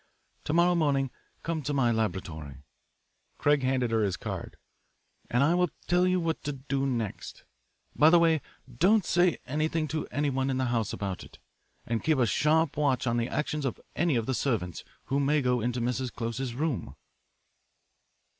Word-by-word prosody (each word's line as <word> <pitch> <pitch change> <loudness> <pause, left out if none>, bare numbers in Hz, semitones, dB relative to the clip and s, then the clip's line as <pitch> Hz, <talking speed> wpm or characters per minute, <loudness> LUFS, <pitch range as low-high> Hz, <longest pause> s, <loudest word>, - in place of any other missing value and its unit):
To 150 - -1
morrow 175 +2 +4
morning 140 -6 +1 0.3
come 165 -1 -2
to 145 +1 -2
my 125 -4 +3
laboratory" 80 - -3 0.7
Craig 145 -1 +3
handed 130 -2 +1
her 110 -1 +2
his 100 -4 0
card - - -6 0.7
"and 125 +3 +3
I 155 +4 +4
will 180 -1 +2 0.2
tell 180 +1 +3
you 185 0 +2
what 165 -1 -1
to 145 - -1
do 135 0 -2
next. 115 -6 -4 0.5
By 155 - +6
the 175 - +7
way, 165 -3 +3 0.4
don't 200 +3 +4
say 175 -1 +3
anything 155 +3 -1
to 155 -1 -3
anyone 135 -1 -1
in 130 - 0
the 130 - +1
house 115 -3 0
about 95 -3 -4
it, - - -15 0.5
and 115 -1 -2
keep 155 -2 +2
a 125 - +3
sharp 150 - +2
watch 140 -5 +1
on 120 -1 +1
the 120 0 -1
actions 150 0 -2
of 135 - -2 0.2
any 170 -3 +2
of 115 -2 0
the 130 - -1
servants 110 - -1 0.2
who 135 +1 0
may 145 +2 +2
go 125 -3 +1
into 120 +2 -1
Mrs. 125 +1 -1
Close's 115 +1 -4
room." 135 - -2
135 Hz, 175 wpm, -28 LUFS, 120-155 Hz, 0.7 s, the